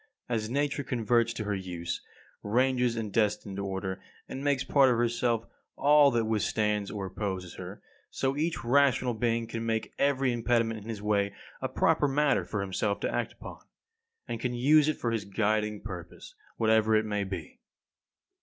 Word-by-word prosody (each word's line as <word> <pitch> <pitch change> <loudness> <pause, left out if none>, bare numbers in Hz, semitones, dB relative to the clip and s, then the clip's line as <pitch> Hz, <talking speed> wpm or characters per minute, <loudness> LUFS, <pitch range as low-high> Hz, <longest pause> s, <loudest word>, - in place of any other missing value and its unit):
As 110 -3 -1
Nature 145 +2 0
converts 115 -2 +1
to 110 - -4
her 105 0 -2
use, 90 -3 -4 0.4
ranges 125 +2 +2
in 110 -3 -3
destined 105 -2 0
order, 95 -1 -3 0.3
and 135 - -6
makes 140 -2 +1
part 140 -2 +4
of 120 - +2
herself 120 -1 +1 0.3
all 145 0 +6
that 120 -3 +1
withstands 105 -1 0
or 100 -3 -4
opposes 95 -2 -4
her; - - -8 0.3
so 135 0 -1
each 160 +1 -1
rational 130 0 +3
being 115 0 0
can 115 0 -5
make 110 -1 -2
every 135 -2 +2
impediment 115 -2 0
in 110 - -10
his 105 -2 -5
way 100 -1 +1 0.3
a - - -2
proper 145 - +2
matter 140 -7 +2
for 100 +3 -3
himself 100 +2 -1
to - - -1
act - - -1
upon, - - -10 0.7
and 115 - -4
can 125 0 -2
use 145 +5 +5
it 155 - 0
for 120 - -1
his 115 -2 -1
guiding 105 +1 0
purpose, 90 -5 -8 0.2
whatever 110 -1 +3
it 110 0 +3
may 105 -1 -1
be. 95 -5 -7
115 Hz, 170 wpm, -29 LUFS, 105-125 Hz, 0.7 s, all